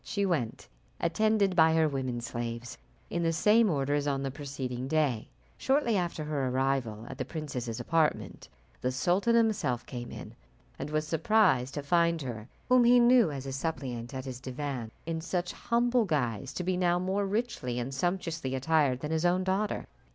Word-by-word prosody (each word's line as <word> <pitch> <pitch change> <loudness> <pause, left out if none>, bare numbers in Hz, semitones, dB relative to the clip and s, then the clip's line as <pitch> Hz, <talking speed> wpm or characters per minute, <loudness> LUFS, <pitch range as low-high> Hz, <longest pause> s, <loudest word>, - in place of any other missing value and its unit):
She 200 -1 -1
went, 150 -12 -2 0.3
attended 200 +2 +2
by 160 -1 +5
her 160 -1 +4
women 130 -4 -2
slaves, 120 0 -5 0.4
in 170 - -1
the 165 -1 +2
same 210 +6 +4
order 145 -3 0
as 145 0 0
on 135 -1 0
the 135 - -2
preceding 130 -3 -5
day. 140 -7 0 0.3
Shortly 265 -4 +2
after 175 -4 -1
her 145 -3 -1
arrival 130 -4 -1
at 130 - -9
the - - 0
princess's 125 -8 -5
apartment, 150 - 0 0.3
the 125 - 0
sultan 180 - +2
himself 195 - +1
came 120 -1 -7
in, - - -9 0.5
and 145 - -4
was 155 0 0
surprised 165 - +2
to 145 - -3
find 170 +2 +2
her, 115 -4 -6 0.2
whom 250 -1 +5
he 245 +1 +6
knew 240 -5 +6
as 140 -2 -5
his 135 0 -4
suppliant 135 -5 -4
at 130 0 -5
his 130 -2 -6
divan 130 -2 -4 0.2
in 165 0 -3
such 180 +1 -2
humble 240 0 +1
guise, 135 - -1
to 180 - -3
be 180 0 0
now 175 -1 +2
more 190 +2 0
richly 200 - -2
and 125 +2 -3
sumptuously 160 -3 -2
attired 135 -2 +2
than 150 - -3
his 160 0 0
own 180 +1 +2
daughter. 195 +3 -1
155 Hz, 180 wpm, -29 LUFS, 130-185 Hz, 0.5 s, he